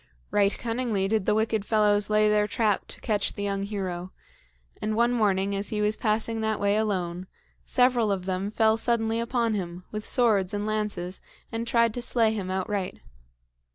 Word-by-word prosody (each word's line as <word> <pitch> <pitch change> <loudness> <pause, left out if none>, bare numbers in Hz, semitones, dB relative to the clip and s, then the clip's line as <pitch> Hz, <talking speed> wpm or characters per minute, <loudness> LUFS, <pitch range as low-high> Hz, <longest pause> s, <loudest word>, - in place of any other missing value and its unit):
Right 200 0 +2
cunningly 230 -5 -1
did 215 -1 0
the - - +3
wicked 220 -1 +1
fellows 210 -1 +2
lay 215 0 +4
their 210 0 +3
trap 215 -3 0
to - - -7
catch 210 -2 0
the 205 - -5
young 200 -1 -1
hero; 190 -3 -4 0.7
and 215 0 -1
one 235 +2 +3
morning, 200 -3 +1
as 200 +1 -1
he 215 - -2
was 210 +1 +2
passing 220 +1 -1
that 220 -1 0
way 200 0 +2
alone, 185 -4 -1 0.4
several 245 -4 +3
of 190 -2 -2
them 190 +1 -2
fell 220 +1 +3
suddenly 225 -1 +1
upon 235 -1 0
him, 180 -3 -4
with 215 0 -5
swords 205 -6 +2
and 205 0 -2
lances, 210 -4 -2 0.3
and 230 +1 -3
tried 230 -1 +3
to 245 - -4
slay 230 -2 +2
him 195 -4 -4
outright. 190 0 -3
210 Hz, 180 wpm, -26 LUFS, 195-225 Hz, 0.7 s, lay